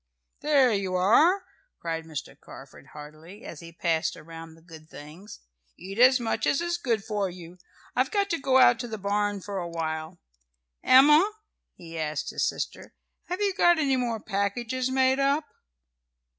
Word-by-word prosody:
"There 275 -5 +3
you 195 -2 -2
are!" 310 - +4 0.3
cried 165 -1 -4
Mr. 155 -3 -7
Carford 135 0 -14
heartily, 155 +7 -12
as 155 - -9
he 165 0 -11
passed 165 -1 -1
around 165 0 -11
the 165 - -21
good 160 -2 -14
things. 165 +8 -12 0.4
"Eat 195 +4 -8
as 255 +1 +6
much 230 -2 -2
as 275 - +2
is 345 0 -2
good 230 - -1
for 205 -3 -2
you. 175 0 -12 0.4
I've - - +1
got 405 -2 0
to 335 - -1
go 270 -1 +2
out 245 -2 +6
to 240 - -4
the 220 -1 -6
barn 205 0 -1
for 200 0 -5
a 175 -1 -5
while. 160 0 -4 0.7
Emma," 300 +9 +6 0.4
he 165 -1 -9
asked 155 -1 -3
his - - 0
sister, - - -7 0.3
"have 360 +3 -4
you 400 -1 +1
got 345 -1 +4
any 280 -4 +1
more 240 -3 -2
packages 225 +6 -2
made 260 0 +2
up?" 280 +3 +1
205 Hz, 170 wpm, -26 LUFS, 165-260 Hz, 0.7 s, as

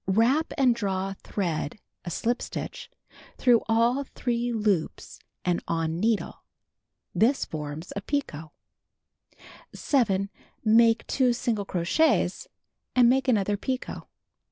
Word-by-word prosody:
Wrap 235 - +2
and 260 -4 +4
draw 195 -4 -2
thread 175 -4 -3 0.3
(a - - -3
shp 235 +8 -1
stitch) - - -6 0.5
through 240 -3 +4
all 235 +5 +3
three 240 -2 -2
loops 210 -7 -1 0.3
and 175 -1 +1
on 165 0 -1
needle. 220 +1 -1 0.7
This 255 +6 +2
forms 150 +2 -6
a 200 - -3
picot. 200 - -3 1.3
7. 200 -8 +1 0.3
Make 225 +1 +5
2 255 -3 +2
single 235 -4 -1
crochets, 190 - +1 0.5
and 245 -2 +6
make 265 +1 +1
another 205 -4 +2
picot. 260 +5 -4
225 Hz, 110 wpm, -26 LUFS, 190-245 Hz, 1.3 s, and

